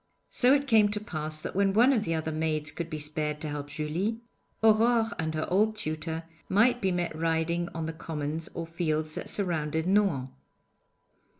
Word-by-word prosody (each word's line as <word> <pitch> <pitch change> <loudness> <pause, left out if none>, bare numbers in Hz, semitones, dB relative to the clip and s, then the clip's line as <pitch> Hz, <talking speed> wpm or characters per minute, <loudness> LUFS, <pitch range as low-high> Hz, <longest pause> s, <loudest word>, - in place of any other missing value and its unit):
So 250 +1 +4
it 285 0 0
came 220 -5 +5
to 210 0 -1
pass 155 -6 -2
that - - -5
when 195 0 +2
one 245 +6 +5
of 220 -5 0
the 165 -1 0
other 160 0 -2
maids 155 -1 -1
could 170 -1 -5
be 155 - -4
spared 150 0 -1
to 155 - -2
help 145 -1 -5
Julie, 160 +10 -2 0.4
Aurore 225 +1 +4
and 160 -1 -2
her 155 - -2
old 215 +3 +3
tutor 160 -3 -4 0.3
might 240 +5 +3
be 190 -2 +1
met 175 -2 -2
riding 165 +2 0
on 165 -1 -3
the 160 - -4
commons 160 0 -4
or 165 - -3
fields 155 -2 -1
that 180 - -3
surrounded 160 -5 0
Nohant. 185 -9 +2
165 Hz, 185 wpm, -28 LUFS, 155-205 Hz, 0.4 s, came